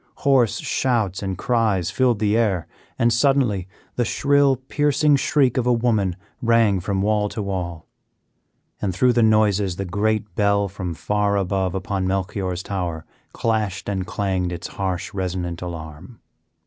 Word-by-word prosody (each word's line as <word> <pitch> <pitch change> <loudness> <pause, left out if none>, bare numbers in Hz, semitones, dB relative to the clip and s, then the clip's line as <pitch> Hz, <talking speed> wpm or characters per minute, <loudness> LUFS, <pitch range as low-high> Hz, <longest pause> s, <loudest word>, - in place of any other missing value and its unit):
Hoarse 130 -6 +3
shouts 110 -8 0
and 95 -2 -3
cries 110 -8 +1
filled 125 -3 +2
the 105 0 +1
air, 105 -7 +1 0.3
and 120 0 +3
suddenly 120 -8 +2 0.3
the 125 - +2
shrill, 140 +2 +3
piercing 145 +3 +2
shriek 135 -2 +2
of 125 -1 +1
a - - +4
woman 110 -6 +1 0.3
rang 115 -4 +3
from 95 +1 -1
wall 105 0 +1
to 110 - -4
wall; 90 -4 -4 1.0
and 95 -4 -1
through 125 +5 +3
the 120 - +3
noises 105 -4 +3
the 95 - -4
great 105 +2 -1
bell 100 -1 +2
from 95 -3 -5
far 105 +2 0
above 95 -1 -1
upon 95 0 -2
Melchior's 95 -1 -2
tower 90 -5 -4 0.3
clashed 110 -4 -1
and 95 -2 -2
clanged 95 -3 -1
its 85 -1 -6
harsh, 95 +1 -3
resonant 90 -3 -3
alarm. 85 +4 -8
100 Hz, 150 wpm, -22 LUFS, 95-115 Hz, 1.0 s, a